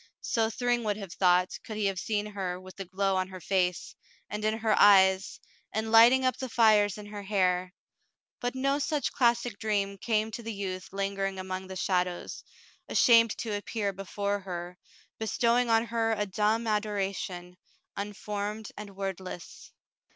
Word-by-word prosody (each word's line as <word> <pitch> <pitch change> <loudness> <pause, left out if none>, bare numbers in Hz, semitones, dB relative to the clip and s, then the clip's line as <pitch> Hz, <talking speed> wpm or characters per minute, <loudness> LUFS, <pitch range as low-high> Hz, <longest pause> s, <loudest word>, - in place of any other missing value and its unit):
So 225 -1 0
Thryng 240 +1 0
would 210 -1 0
have 195 -5 -7
thought, 180 -1 +2
could 215 - -7
he 210 - 0
have 195 -1 0
seen 210 -1 -1
her 190 -4 -4
with 185 0 -13
the 195 - -6
glow 195 +1 0
on 185 0 0
her 185 -1 -9
face, 180 -1 -1 0.4
and 210 +1 -4
in 215 +1 +1
her 220 -1 +1
eyes, 190 -1 +5 0.3
and 220 +1 -2
lighting 240 +4 +7
up 255 - +1
the 260 - -5
fires 215 -4 +4
in 210 - -9
her 205 0 -7
hair; 185 -2 +1 0.7
but 245 +2 -3
no 275 +2 +1
such 295 0 -1
classic 235 -1 +1
dream 200 -2 -1
came 220 0 0
to 235 - -6
the 230 0 -5
youth 185 -2 -5
lingering 195 0 -2
among 185 0 -5
the 190 - -7
shadows, 180 -1 -1 0.5
ashamed 230 -2 +5
to 220 -3 -3
appear 205 0 -2
before 200 +1 -3
her, 180 -2 -6 0.4
bestowing 235 +2 +1
on 225 0 +3
her 225 -1 0
a 210 -1 -1
dumb 215 +3 0
adoration, 195 -4 -2 0.4
unformed 210 +1 -4
and 205 -2 -9
wordless. 190 -2 -6
205 Hz, 165 wpm, -29 LUFS, 190-225 Hz, 0.7 s, lighting